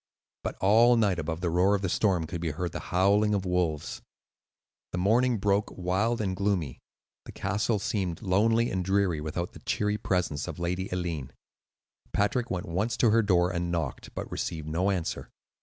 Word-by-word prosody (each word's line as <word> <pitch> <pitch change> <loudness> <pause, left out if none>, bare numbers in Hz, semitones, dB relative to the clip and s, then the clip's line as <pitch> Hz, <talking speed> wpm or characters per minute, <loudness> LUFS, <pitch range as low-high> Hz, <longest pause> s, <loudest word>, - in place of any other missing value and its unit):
But - - -3
all 115 +5 +6
night 100 -6 +2
above 80 +1 -3
the 85 -3 0
roar 90 +4 +3
of 100 - -3
the - - +1
storm 90 -2 +1
could 85 +1 -5
be 85 - -1
heard 85 +3 -3
the - - -5
howling 100 +3 +3
of 95 -1 -1
wolves. 90 -4 -1 0.9
The - - -1
morning 115 +6 +3
broke 100 +1 +1
wild 95 +6 0
and 95 -3 -1
gloomy; 95 -8 -1 0.5
the - - -8
castle 105 +2 0
seemed 100 -4 -2
lonely 115 +5 +2
and 95 -1 -1
dreary 95 -4 +1
without 85 +3 -3
the - - -11
cheery 105 0 -1
presence 90 -6 -1
of - - -6
Lady 90 +2 -2
Eileen. 85 -7 -3 0.8
Patrick 115 +4 +1
went 90 -2 -2
once 100 +8 -1
to 115 - +4
her 115 +1 +5
door 90 -4 +3
and 85 -1 -2
knocked, 80 -6 -4
but - - -5
received 80 -3 -4
no 85 +5 0
answer. 90 -4 -2
95 Hz, 180 wpm, -28 LUFS, 85-105 Hz, 0.9 s, all